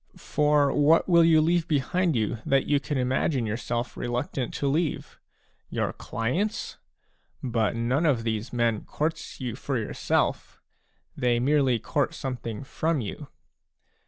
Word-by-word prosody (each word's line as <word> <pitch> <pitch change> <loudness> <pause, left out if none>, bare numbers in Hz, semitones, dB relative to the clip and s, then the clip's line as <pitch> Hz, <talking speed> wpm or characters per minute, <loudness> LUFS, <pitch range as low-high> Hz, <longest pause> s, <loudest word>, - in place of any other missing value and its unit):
For 150 -1 +2
what 150 +3 +4
will 170 -2 +6
you 160 -1 +5
leave 170 +1 +2
behind 160 +3 +1
you 110 0 -1
that 135 0 +2
you 145 -1 +2
can 140 0 -3
imagine 130 0 +1
yourself 120 +2 -3
reluctant 125 +1 -3
to 140 - -1
leave? 155 +3 -1 0.5
Your - - -1
clients? 130 - -2 0.7
But 115 -3 0
none 125 +8 +1
of 125 -6 +2
these 110 0 -2
men 115 -3 0
courts 155 +2 -3
you 125 -4 -4
for 135 0 -2
yourself; 110 - -1 0.6
they 120 -1 +1
merely 135 -1 +3
court 140 +5 -1
something 125 -3 -5
from 160 +3 -1
you. 105 - -6
135 Hz, 135 wpm, -26 LUFS, 120-150 Hz, 0.7 s, will